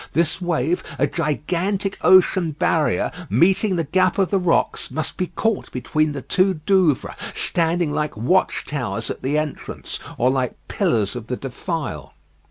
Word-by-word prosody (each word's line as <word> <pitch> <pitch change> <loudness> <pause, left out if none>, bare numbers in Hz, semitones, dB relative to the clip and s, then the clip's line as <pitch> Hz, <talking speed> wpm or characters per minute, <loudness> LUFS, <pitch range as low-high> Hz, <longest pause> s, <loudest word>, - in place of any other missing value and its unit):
This 170 +3 +1
wave, 170 -1 0
a 140 - +3
gigantic 175 +6 -1
ocean 185 -3 +5
barrier, 155 +1 +1 0.2
meeting 190 +3 +3
the 165 - 0
gap 185 +6 +2
of 195 -2 +1
the 195 - +3
rocks, 180 -2 +1
must 160 - -4
be 185 - -1
caught 225 +2 -2
between 155 +4 0
the 140 -3 -6
two 190 0 +2
Douvres, 165 -2 +2 0.2
standing 170 -1 +1
like 150 -5 -2
watch 160 - +1
towers 115 -7 -3
at - - -7
the 140 +3 0
entrance, 150 -1 -4 0.2
or 125 +2 +3
like 130 -2 -1
pillars 105 -2 0
of 115 -2 -6
the 125 - -3
defile. 135 - -5
160 Hz, 155 wpm, -22 LUFS, 135-185 Hz, 0.2 s, ocean